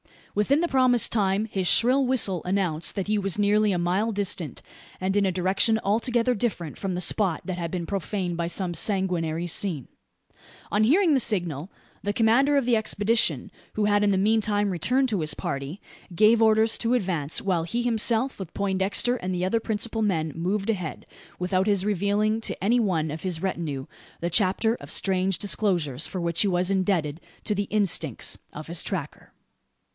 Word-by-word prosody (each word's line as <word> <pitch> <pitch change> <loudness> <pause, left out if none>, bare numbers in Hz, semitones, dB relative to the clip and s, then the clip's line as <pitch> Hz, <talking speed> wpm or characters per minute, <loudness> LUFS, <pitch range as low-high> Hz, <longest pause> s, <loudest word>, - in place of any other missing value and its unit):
Within 270 +9 +2
the 345 - +1
promised 255 -5 +3
time 200 -1 +1
his 195 -4 -2
shrill 255 +8 +4
whistle 205 -9 +2
announced 180 -4 0
that 195 -2 -3
he 210 0 +1
was 195 -1 -1
nearly 210 +1 +2
a 180 - 0
mile 185 +6 0
distant, 185 -8 -1 0.4
and 190 +1 -1
in 200 -1 +2
a - - +1
direction 190 +5 +2
altogether 235 +4 +1
different 200 - -3
from 190 -2 -3
the 180 - -3
spot 185 -1 +1
that 185 -2 -4
had 170 -1 -3
been 175 -1 -4
profaned 190 -1 -3
by 170 0 -2
some 175 +1 -1
sanguinary 175 -4 -1
scene. 170 -5 -2 0.8
On 210 +1 +3
hearing 330 - +4
the 270 - +3
signal, 175 - -1 0.3
the 205 - -2
commander 240 +7 +3
of 275 - +1
the 240 -2 +3
expedition 210 - 0 0.2
who 215 - 0
had 205 0 +2
in 205 - +3
the 195 - +2
meantime 205 0 +1
returned 250 - +1
to 205 -5 -1
his 155 -2 +1
party 140 +6 -5 0.3
gave 220 +4 +4
orders 220 0 +3
to 235 +1 0
advance; 175 -10 -1
while 180 -5 0
he 235 +8 -2
himself, 235 +2 +1
with 185 -4 -7
Poindexter 200 +5 0
and 185 -4 -4
the 180 - -2
other 225 +5 +1
principal 225 0 -2
men, 165 -7 0
moved 195 +5 -2
ahead, 180 -7 -5 0.3
without 185 +2 0
his 200 -2 +2
revealing 210 +2 0
to 215 - -4
any 235 +5 +3
one 165 -8 0
of 155 - -6
his 180 -4 -3
retinue 160 -8 -3 0.4
the 170 +1 -2
chapter 210 +4 +2
of - - -12
strange 190 -1 +1
disclosures 175 - -1
for 185 - -5
which 170 -1 0
he 205 - +3
was 180 0 +1
indebted 180 -5 0 0.2
to 210 - -1
the 205 0 -1
"instincts" 165 - 0
of 150 - -8
his 170 0 -1
tracker. 165 -7 -6
195 Hz, 180 wpm, -25 LUFS, 175-220 Hz, 0.8 s, shrill